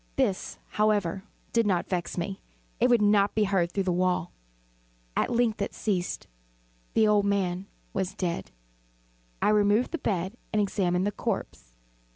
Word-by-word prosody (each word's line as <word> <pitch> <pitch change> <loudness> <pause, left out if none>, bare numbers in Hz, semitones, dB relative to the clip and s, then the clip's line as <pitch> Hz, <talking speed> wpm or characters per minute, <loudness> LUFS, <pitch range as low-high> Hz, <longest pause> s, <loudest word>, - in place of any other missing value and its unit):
This, 230 -9 0
however, 205 -3 +1 0.3
did 230 -2 +3
not 180 -3 +1
vex 180 -2 -2
me; 190 +3 -3 0.4
it 245 - +4
would 240 -3 +5
not 205 -1 +4
be 215 - +3
heard 190 -4 +1
through 195 - 0
the 185 - 0
wall. 180 -1 +1 0.8
At - - +1
length 235 -3 +1
it 200 - -2
ceased. 185 -5 -1 0.7
The 220 -1 +5
old 210 -1 +4
man 195 -2 0 0.3
was 190 0 -2
dead. 175 -4 -2 0.9
I - - +4
removed 210 +3 +3
the 335 - -2
bed 190 +2 -2
and 215 - +1
examined 190 -3 +1
the 205 - +1
corpse. - - -4
200 Hz, 155 wpm, -28 LUFS, 180-210 Hz, 0.9 s, would